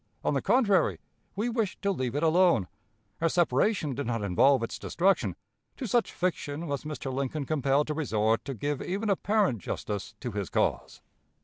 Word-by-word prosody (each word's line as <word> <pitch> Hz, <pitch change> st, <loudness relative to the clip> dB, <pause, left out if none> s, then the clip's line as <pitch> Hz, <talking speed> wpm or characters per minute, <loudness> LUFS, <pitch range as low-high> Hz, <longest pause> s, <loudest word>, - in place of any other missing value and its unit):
On -, -, +1 dB
the -, -, +1 dB
contrary, 205 Hz, -9 st, +3 dB, 0.4 s
we 210 Hz, +5 st, -1 dB
wished 225 Hz, -4 st, -1 dB
to 200 Hz, -, +2 dB
leave 130 Hz, -8 st, -2 dB
it 145 Hz, -, 0 dB
alone. 165 Hz, -, +4 dB, 0.5 s
Our 165 Hz, -, +3 dB
separation 170 Hz, -, +1 dB
did 140 Hz, +1 st, -4 dB
not 115 Hz, -3 st, -1 dB
involve 115 Hz, +7 st, +4 dB
its 115 Hz, -, -4 dB
destruction. 190 Hz, +3 st, +1 dB, 0.4 s
To 265 Hz, -, -4 dB
such 235 Hz, +3 st, +1 dB
fiction 165 Hz, -3 st, -2 dB
was 145 Hz, -2 st, -3 dB
Mr. 145 Hz, -3 st, -4 dB
Lincoln 140 Hz, +2 st, -2 dB
compelled 140 Hz, 0 st, +1 dB
to 155 Hz, -, -2 dB
resort 110 Hz, -7 st, +1 dB
to 135 Hz, -1 st, -4 dB
give 145 Hz, +5 st, -2 dB
even 200 Hz, +3 st, -1 dB
apparent 200 Hz, -, +1 dB
justice 100 Hz, +2 st, -5 dB
to 125 Hz, -, -3 dB
his 100 Hz, -3 st, -3 dB
cause. -, -, -1 dB
150 Hz, 175 wpm, -28 LUFS, 130-185 Hz, 0.5 s, alone